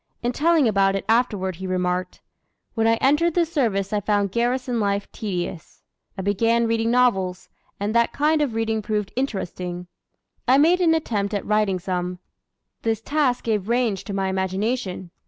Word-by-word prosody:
In 240 - +1
telling 315 +1 +3
about 195 -2 +2
it 195 - -3
afterward 210 -6 +1
he 190 +1 -5
remarked: 180 0 -2 0.5
"When 225 -1 +1
I 225 - +4
entered 295 +7 +2
the 345 -1 +3
service 220 - -1
I 210 - +2
found 205 -1 0
garrison 245 +2 0
life 200 -1 0
tedious. 180 -5 -5 0.3
I 190 - -4
began 230 +4 +2
reading 225 0 +1
novels, 195 -7 +1 0.3
and 205 +2 -1
that 235 0 +3
kind 300 +1 +2
of 265 -7 -1
reading 225 -1 0
proved 210 -1 -2
interesting. 180 -8 -3 0.6
I 260 +2 +6
made 340 +5 +4
an 325 -2 +4
attempt 210 -9 -1
at 200 - -3
writing 210 -3 +1
some; 180 0 -3 0.6
this 225 -2 0
task 275 0 0
gave 210 -3 -1
range 235 -5 +1
to 205 - -5
my 195 -1 0
imagination. 190 0 -2
215 Hz, 165 wpm, -23 LUFS, 190-245 Hz, 0.6 s, I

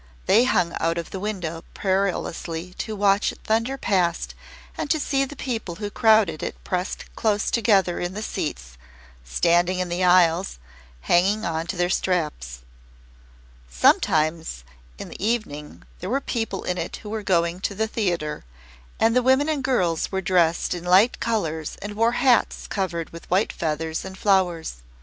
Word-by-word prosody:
They 225 +5 +5
hung 180 -9 +1
out 165 +1 0
of 170 - -5
the 190 - -5
window 180 -5 -4
perilously 180 -3 -2
to 220 - -3
watch 200 0 +3
it - - -13
thunder 230 +5 0
past 180 -8 0 0.4
and - - -4
to 315 - +2
see 275 -1 +1
the 290 - -10
people 225 -10 -4
who 205 +2 -5
crowded 215 -9 +3
it - - -4
pressed 180 0 -4
close 210 -1 0
together 200 -6 +2
in 175 +2 -3
the 215 - -4
seats, 60 - -5 0.4
standing 175 - +2
in 180 -1 -2
the 175 +2 -1
aisles, 180 - +4 0.4
hanging 195 - +2
on 165 0 -2
to 185 - -3
the 175 0 +2
straps. 150 - -1 1.1
Sometimes 155 - +2 0.3
in - - -8
the - - -8
evening 210 -10 -3 0.2
there 185 - -5
were 265 +4 +1
people 225 -7 -3
in 180 0 -2
it 165 - -4
who 210 - -7
were 220 0 -2
going 170 -2 +1
to 200 +1 -3
the 220 +2 0
theatre, 175 -9 -2 0.6
and 225 +1 +3
the 250 - +5
women 265 +4 +3
and 295 -4 -1
girls 180 - 0
were 190 - 0
dressed 175 -3 +2
in 175 -1 -6
light 190 +7 +4
colours 165 -9 -2
and 205 +1 -6
wore 230 +3 +2
hats 250 -1 +2
covered 170 -5 -3
with 165 - -11
white 190 +4 +2
feathers 160 0 -2
and 190 0 -8
flowers. 180 - +1
185 Hz, 165 wpm, -24 LUFS, 170-215 Hz, 1.1 s, They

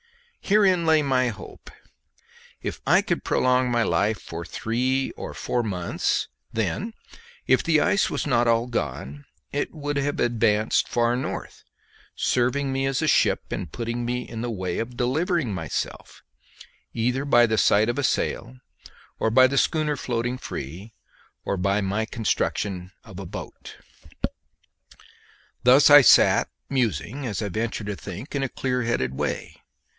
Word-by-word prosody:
Herein 195 -4 +3
lay 160 -1 +4
my 130 -2 +2
hope; 115 - -8 0.9
if - - -5
I - - +5
could - - -2
prolong 125 0 +2
my 120 -1 +2
life 105 +1 +1
for 85 +1 -7
three 125 - -1
or - - -8
four 120 - -1
months, 90 -5 -1 0.2
then, 225 +3 -2 0.5
if - - +4
the 160 -2 +3
ice 205 +4 +2
was - - -2
not 120 0 +2
all 115 0 +3
gone, 70 - -4 0.3
it 145 - -2
would 145 -2 -4
have 145 +1 -1
advanced 110 -3 +2
far 120 0 +1
north, 125 - -5 0.5
serving 130 +3 0
me 135 0 0
as 135 +2 0
a - - +1
ship - - +2
and 90 -6 -4
putting 120 +3 -3
me 125 +1 -3
in 115 -1 -6
the 120 - -3
way 95 -5 -3
of 120 +2 -5
delivering 145 - 0
myself, 80 -7 -5 0.7
either 125 +4 0
by 120 -4 +5
the 110 -1 0
sight 105 +2 +4
of 120 +4 -1
a - - -1
sail, 125 0 -1 0.6
or 110 - +1
by 130 +3 +6
the 135 +2 0
schooner 155 -2 +1
floating 120 -1 -2
free, 95 - -7 0.5
or - - 0
by 100 +2 +1
my 105 +2 -1
construction 100 -4 -2
of 100 -4 -10
a 95 - -6
boat. - - -9 1.9
Thus 130 +4 +7
I 145 0 +11
sat 125 - +5 0.2
musing, 125 - -1
as 110 -3 -3
I 105 - -2
venture 110 +3 -3
to 105 0 -3
think, 100 - -8
in 140 - 0
a 135 - -1
clearheaded 120 - -1
way. - - -3
120 Hz, 150 wpm, -24 LUFS, 105-135 Hz, 1.9 s, I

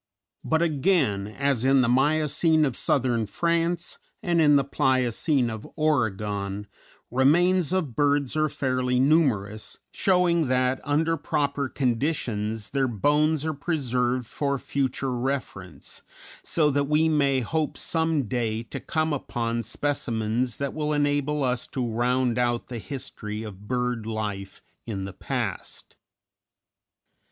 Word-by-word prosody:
But, 160 +1 +1
again, 145 - +1
as 135 +2 -1
in 135 0 +5
the 125 - +2
Miocene 155 +4 +3
of 130 -4 -2
Southern 120 -5 +1
France 170 - -1 0.2
and 170 -2 +2
in 145 -2 +6
the 140 - +4
Pliocene 130 0 +1
of 110 -1 -6
Oregon, 105 -9 -1 0.5
remains 170 +7 +3
of 165 -11 -1
birds 145 -2 +1
are 155 0 +2
fairly 130 -2 0
numerous, 130 -8 +1 0.2
showing 175 -4 +2
that, 130 0 +1
under 160 +3 +1
proper 140 -2 -1
conditions, 115 -5 -1
their 135 -1 +1
bones 150 +6 +1
are 160 - -1
preserved 125 -5 -1
for 140 +4 -2
future 135 -1 -2
reference, 120 - -5 0.4
so 150 -3 +1
that 140 +1 +1
we 150 +3 +3
may 140 -4 +2
hope 155 +6 -2
some 160 -3 0
day 115 -1 -2
to 115 - -7
come 155 -1 -1
upon 115 -4 -2
specimens 120 -3 -1
that 140 -1 -3
will 150 -1 -1
enable 145 0 +1
us 125 -1 -1
to 125 -3 -3
round 120 +1 +1
out 120 -1 0
the 120 -2 -5
history 110 -5 -6
of 105 -1 -10
bird 125 -2 -1
life 105 -3 -4 0.2
in 100 -4 -3
the 95 - -7
past. - - -5
135 Hz, 130 wpm, -25 LUFS, 115-150 Hz, 0.5 s, in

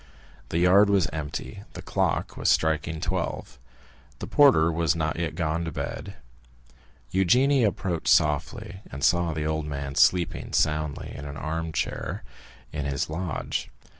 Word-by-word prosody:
The - - -1
yard 95 +4 +5
was 100 -4 +3
empty; 80 +6 -5
the - - -7
clock - - -1
was - - 0
striking 80 0 +1
twelve. - - -3 0.6
The - - -6
porter 130 - +5
was 85 -1 +1
not 80 0 -1
yet 80 -3 -2
gone 80 -1 -1
to 80 - -4
bed. 100 +6 -5 1.0
Eugénie 125 +9 +4
approached 95 -5 -1
softly, 90 +7 +1
and 70 0 -6
saw 85 +1 +3
the 75 -1 -3
old 80 -1 -1
man 70 -1 -4
sleeping 90 +4 +2
soundly 75 -1 0
in 75 - -7
an 70 0 -7
armchair 80 0 -3 0.5
in 75 - -3
his 70 +1 -2
lodge. 80 -2 -3
80 Hz, 140 wpm, -26 LUFS, 75-90 Hz, 1.0 s, yard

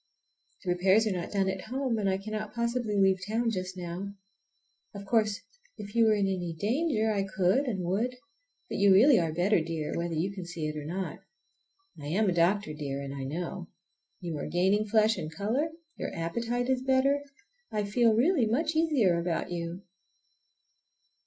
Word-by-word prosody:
"The 180 - 0
repairs 190 +5 +4
are 215 - +1
not 180 -2 -3
done 195 -2 +1
at 190 -1 -3
home, 255 -1 -1
and 200 -2 +1
I 190 - +1
cannot 215 +1 -5
possibly 235 -2 -1
leave 190 -1 +4
town 230 +2 0
just 185 -2 -4
now. 180 +3 -5 0.8
Of 200 0 -7
course 215 0 +1 0.4
if 205 0 -8
you 230 -1 +4
were 215 -1 +4
in 200 -1 +1
any 180 -3 -2
danger 225 - +1
I 205 -2 +1
could 195 +7 +1
and 195 -8 -2
would, 220 +8 0 0.5
but - - -4
you 200 0 +6
really 230 +5 +7
are 165 -2 0
better, 175 +3 +2
dear, 160 -1 -3
whether 170 -1 -2
you 180 +5 -1
can 190 -2 -6
see 170 -2 -5
it 155 - -4
or 150 -1 -5
not. 185 +4 -4 0.8
I 145 - -6
am 200 +8 +1
a 185 - +2
doctor, 175 0 +2
dear, 140 -2 -4
and 140 0 -5
I 135 -1 -5
know. 165 +5 -4 0.5
You 170 -5 -4
are - - -4
gaining 190 +6 +2
flesh 220 +1 +3
and 155 - -5
color, 220 - -1 0.3
your - - -4
appetite 235 +9 -2
is 260 -1 +1
better. 265 +2 +2 0.5
I 210 -1 -1
feel 220 +2 +3
really 260 0 +3
much 305 +8 0
easier 270 - +3
about 170 0 -2
you." 170 +2 -4
200 Hz, 185 wpm, -29 LUFS, 175-225 Hz, 0.8 s, really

